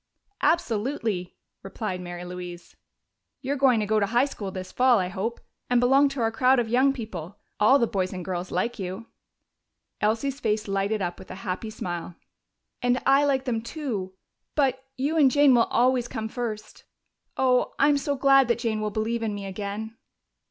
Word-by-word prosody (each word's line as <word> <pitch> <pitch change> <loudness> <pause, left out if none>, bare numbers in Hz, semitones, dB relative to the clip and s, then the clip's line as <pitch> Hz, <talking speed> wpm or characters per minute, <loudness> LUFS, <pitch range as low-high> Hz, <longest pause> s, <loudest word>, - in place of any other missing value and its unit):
"Absolutely!" 225 - 0 0.3
replied 195 -1 -5
Mary 175 0 -7
Louise. 180 -1 -8 0.7
"You're 275 +1 -1
going 260 -4 +4
to - - 0
go 215 +1 +2
to 200 - +1
high 240 +5 +3
school 210 -8 -6
this 185 -1 -7
fall, 255 -1 +4
I 180 -2 0
hope, 205 +5 -3 0.3
and 245 -1 +4
belong 270 +3 +4
to 275 -2 -4
our 225 0 +1
crowd 255 +3 +3
of 240 -2 +1
young 255 +4 +3
people. 205 - -7 0.2
All 235 +7 +6
the 235 - +2
boys 190 -4 -2
and 180 -2 -6
girls 180 -1 -3
like 230 +6 -2
you." 190 +4 -5 1.0
Elsie's 230 +6 0
face 215 -3 -1
lighted 195 +1 0
up 175 0 -4
with 190 - -12
a - - -7
happy 190 +4 -3
smile. 175 -4 -5 0.7
"And 245 +1 +2
I 275 +2 +5
like 270 -2 +1
them, 230 -4 -1
too 225 - -5 0.4
but 265 -3 +1
you 290 +5 0
and 285 -4 +6
Jane 285 0 +5
will 235 -1 +5
always 250 0 +2
come 220 -3 -4
first. 225 -3 -5 0.5
Oh, 255 -1 +2
I'm 285 0 +4
so 285 +1 -1
glad 275 -1 +5
that 235 - +2
Jane 225 -3 -1
will 215 - -1
believe 220 +2 -2
in 215 -2 -2
me 200 -1 -6
again!" 205 +3 -5
225 Hz, 180 wpm, -26 LUFS, 195-260 Hz, 1.0 s, All